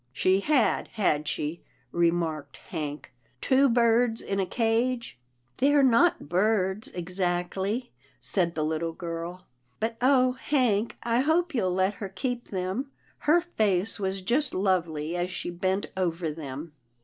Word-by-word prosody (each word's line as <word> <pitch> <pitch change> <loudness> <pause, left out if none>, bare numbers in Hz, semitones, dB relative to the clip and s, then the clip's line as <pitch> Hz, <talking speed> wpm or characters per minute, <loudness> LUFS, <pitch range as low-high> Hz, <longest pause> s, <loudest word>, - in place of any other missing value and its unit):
" - - -43
She 190 +1 +4
had, 265 +2 +2
had 155 -8 +1
she," 155 +4 -3 0.3
remarked 165 -4 0
Hank, 150 -3 -6
" 125 +1 -39
two 270 +1 +5
birds 235 -1 +3
in 195 - -2
a 190 - 0
cage? 230 - 0
" 120 0 -44
" 120 - -42
They're 285 +2 +4
not 265 - +4
birds 190 +3 +1
exactly," 185 +5 -2 0.3
said 175 -3 +1
the 155 -1 0
little 160 +1 -2
girl, 170 +1 -6 0.3
"but 225 +1 -2
oh! 255 -1 +4
Hank, 250 -5 0
I 235 0 +1
hope 325 +5 +2
you'll 185 -8 0
let 190 +2 +2
her 200 - -3
keep 245 +4 -3
them. 190 +8 -3 0.4
Her 345 +3 +6
face 215 - 0
was 190 -1 -2
just 265 +8 +1
lovely 175 -4 0
as 175 +1 -1
she 180 -1 -4
bent 185 +3 -1
over 170 -3 -1
them." 150 0 -7
190 Hz, 150 wpm, -27 LUFS, 170-235 Hz, 0.4 s, Her